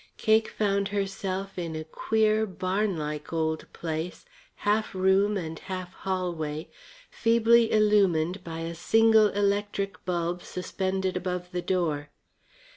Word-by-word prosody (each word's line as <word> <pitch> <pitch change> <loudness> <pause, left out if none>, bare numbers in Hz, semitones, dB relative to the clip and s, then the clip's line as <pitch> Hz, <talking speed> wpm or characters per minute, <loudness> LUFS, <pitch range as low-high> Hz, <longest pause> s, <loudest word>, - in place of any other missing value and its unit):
Cake 220 0 +3
found 200 -2 0
herself 195 -1 -3
in 165 -2 -4
a 155 - -4
queer, 220 +6 +1
barnlike 185 -6 -2 0.4
place, 165 - -4 0.3
half 210 0 0
room 190 +2 +3
and 160 -3 -5
half 185 -1 -6
hallway, 170 -6 -3 0.4
feebly 230 0 +4
illumined 195 -4 +3
by 165 -1 -6
a 165 +1 -4
single 220 +5 +5
electric 200 0 -1
bulb 175 0 -1
suspended 190 +1 -2
above 180 0 -3
the 180 - -2
door. 160 -6 -1
190 Hz, 115 wpm, -27 LUFS, 175-205 Hz, 0.4 s, single